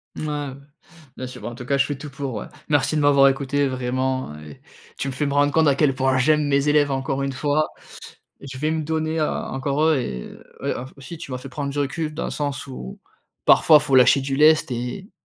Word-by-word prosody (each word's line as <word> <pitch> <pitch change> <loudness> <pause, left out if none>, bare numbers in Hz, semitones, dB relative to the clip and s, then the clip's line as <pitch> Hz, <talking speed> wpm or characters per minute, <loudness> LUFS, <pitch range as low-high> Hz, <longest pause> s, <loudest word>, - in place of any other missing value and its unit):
Mouais, - - -5
ouais, 145 -2 -3 0.6
bien 130 - -6
sûr, 125 -1 -10
bah, - - -6
en 120 - -9
tout 125 - -9
cas, 140 +3 +1
je 140 - +3
fais 145 -2 -4
tout 145 +1 -8
pour, 135 -2 -5
ouais. - - -5 0.2
Merci 145 +1 +2
de - - +1
m'avoir 140 -1 +6
écouté 140 +1 0
vraiment 130 - -2
et 75 -1 -12 0.4
tu 140 - -3
me 135 - -3
fais 135 +4 -1
me 140 - -1
rendre 145 0 +3
compte 160 -1 +4
à 140 - +3
quel 140 -2 +2
point 130 0 +1
j'aime 150 +2 +2
mes 140 +1 +2
élèves 145 -1 +3
encore 135 0 -2
une 135 - -1
fois. 145 +3 0 0.7
Je 135 -1 -9
vais 155 +4 -1
me 160 -1 -1
donner 160 +1 -1
encore 140 0 -1
eux 160 -3 +3
et 65 - -5 0.3
ouais, - - -1 0.2
aussi 155 +4 -9
tu 140 - -9
m'as 125 - -3
fait 125 +1 -9
prendre 140 +1 -4
du 145 - -5
recul 150 +2 -2
dans 160 - -4
le - - -3
sens 145 -2 -3
où, 95 - -8 0.5
parfois, 155 - +7
il - - -4
faut 135 - 0
lâcher 130 +2 +6
du 135 0 -2
lest 155 0 +4
et 125 - -5
140 Hz, 235 wpm, -22 LUFS, 130-150 Hz, 0.7 s, parfois